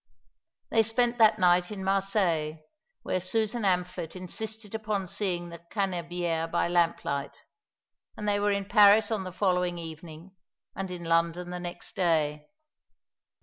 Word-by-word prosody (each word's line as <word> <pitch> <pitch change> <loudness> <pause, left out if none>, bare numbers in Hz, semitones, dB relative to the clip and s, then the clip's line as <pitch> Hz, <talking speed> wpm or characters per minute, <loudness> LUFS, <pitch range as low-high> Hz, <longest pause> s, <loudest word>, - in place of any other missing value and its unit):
They 225 - +5
spent 240 +2 +1
that 220 -1 +6
night 180 -2 +3
in 200 -2 -6
Marseilles, 190 -5 +1 0.5
where 185 - -1
Susan 220 +5 -1
Amphlett 180 -4 -1
insisted 215 +4 -6
upon 215 -3 -2
seeing 185 -3 -3
the 170 0 -9
Cannebière 175 -4 -1
by 170 - +1
lamplight; 170 -5 0 0.8
and 210 - -4
they 205 0 +2
were 205 0 +2
in 200 0 -1
Paris 210 +1 +6
on 205 -4 -1
the 185 - -5
following 180 -2 0
evening, 165 +2 -9 0.4
and 190 -1 -4
in 180 -1 -6
London 170 +1 0
the 180 - -4
next 175 0 -7
day. 155 -5 +1
180 Hz, 140 wpm, -28 LUFS, 170-205 Hz, 0.8 s, that